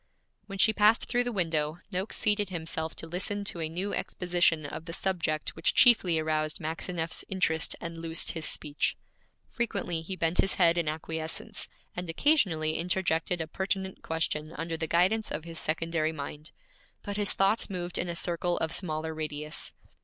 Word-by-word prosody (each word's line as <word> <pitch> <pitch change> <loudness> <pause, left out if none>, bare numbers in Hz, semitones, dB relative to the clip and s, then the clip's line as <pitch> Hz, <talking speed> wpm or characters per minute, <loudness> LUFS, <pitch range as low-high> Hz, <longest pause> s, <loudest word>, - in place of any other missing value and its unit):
When 195 -1 -6
she 220 +3 +5
passed 210 +2 +4
through 245 0 +1
the 245 - -1
window, 160 -6 0
Noakes 190 +2 +1
seated 205 -2 +2
himself 160 -2 -2
to - - -5
listen 190 +5 -1
to 180 - -2
a 160 - -1
new 185 +5 -3
exposition 175 -3 +1
of 155 +3 -6
the 165 - -6
subject 170 -5 -1
which - - +1
chiefly 210 -9 +6
aroused 155 -1 0
Maxineff's 165 +1 -1
interest 170 -5 +1
and 170 -1 -6
loosed 165 0 0
his 160 -2 -3
speech. 150 -1 0 0.5
Frequently 200 -8 -2
he 185 +4 -5
bent 165 -1 0
his 195 - +3
head 170 -2 +5
in 165 - -1
acquiescence, 160 +1 -2 0.3
and 180 -1 -4
occasionally 165 - +3
interjected 175 -1 +1
a 160 - -3
pertinent 190 +2 -2
question 160 -1 -2
under 165 0 -3
the 160 0 -2
guidance 190 +7 +2
of 150 - -3
his 165 -1 -4
secondary 160 0 0
mind; 150 0 -6 0.5
but 205 -1 -4
his 205 -2 +2
thoughts 195 +4 +2
moved 175 -2 -3
in 175 - -1
a 170 - -2
circle 175 +1 -1
of 160 - -1
smaller 160 -3 -1
radius. 150 -1 -4
170 Hz, 170 wpm, -29 LUFS, 160-190 Hz, 0.5 s, chiefly